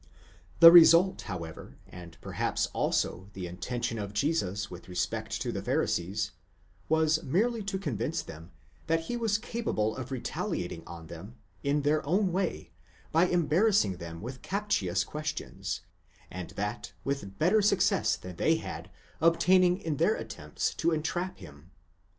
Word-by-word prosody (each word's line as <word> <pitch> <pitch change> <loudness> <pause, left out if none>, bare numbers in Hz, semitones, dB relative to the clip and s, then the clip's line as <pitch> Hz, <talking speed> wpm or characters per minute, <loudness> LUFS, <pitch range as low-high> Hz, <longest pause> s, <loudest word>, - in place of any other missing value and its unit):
2° - - -24
The 165 0 +12
result, 175 +2 +7
however, 85 -4 -7
and 85 -2 -11
perhaps - - -1
also 95 +2 -1
the 95 -2 -5
intention 115 +6 -3
of 100 -1 -5
Jesus 110 - -1
with 90 +1 -10
respect 90 - -2
to - - -2
the - - -4
Pharisees, 105 +5 -1 0.6
was 160 0 +3
merely 215 - +1
to 195 -1 -2
convince 145 - -2
them 80 +2 -11 0.4
that 165 0 +2
he 165 +9 -4
was 225 -3 +1
capable 220 - -2
of 130 -1 -6
retaliating 90 -8 -3
on 85 -1 -9
them, 85 +8 -10 0.3
in 145 +1 0
their 150 +1 +2
own 185 +6 +1
way, 175 - -2 0.4
by 165 +3 +4
embarrassing 175 - +2
them 85 0 -8
with 130 +2 -7
captious 105 - 0
questions, 150 0 -4 0.5
and 90 -1 -6
that 105 +1 -4
with 100 -9 -4
better 195 +7 +4
success 200 0 +3
than 90 -2 -10
they 160 - +3
had 160 - -6 0.3
obtained 180 +2 +4
in 155 -3 -2
their 170 +9 +3
attempts - - -4
to - - +1
entrap 170 +3 -2
him. 75 +3 -13
145 Hz, 145 wpm, -29 LUFS, -, 0.6 s, The